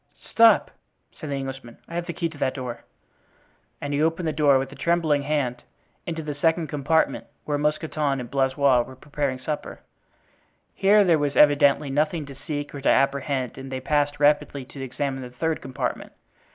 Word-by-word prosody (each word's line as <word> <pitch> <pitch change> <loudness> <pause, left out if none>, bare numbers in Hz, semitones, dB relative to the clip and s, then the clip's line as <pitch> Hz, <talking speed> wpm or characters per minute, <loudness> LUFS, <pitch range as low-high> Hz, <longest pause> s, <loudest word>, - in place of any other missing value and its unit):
"Stop!" 230 -1 +5 0.4
said 155 - -8
the 140 - -1
Englishman, 135 -3 -6
"I - - -11
have 175 0 -3
the 170 - -3
key 170 - -3
of 160 -3 -4
that 130 - 0
door;" 125 -3 -6 0.9
and 145 0 -4
he 145 - +1
opened 165 +2 0
the 155 - 0
door, 145 -2 +4
with 135 0 -3
a - - -10
trembling 165 -4 +1
hand, 140 -4 -1 0.5
into 165 -2 -3
the 150 -1 -4
second 160 +2 +1
compartment, 150 +3 0 0.2
where 145 -1 -1
Mousqueton 150 -2 0
and 120 -2 -7
Blaisois 135 -1 +3
were 130 +2 -8
preparing 140 -1 -3
supper. 150 +3 -5 0.9
Here 205 +2 +5
there 170 -5 +3
was 145 -1 -1
evidently 145 -1 +4
nothing 150 +2 0
to 140 - -10
seek 145 +2 -5
or 140 - -6
to - - +2
apprehend 135 -2 +1
and 135 0 -8
they 130 - -3
passed 145 +1 0
rapidly 145 -2 +2
to 135 +1 -10
examine 135 +1 -3
the 125 - -7
third 160 +6 -2
compartment. 130 -1 -4
145 Hz, 180 wpm, -24 LUFS, 135-155 Hz, 0.9 s, Stop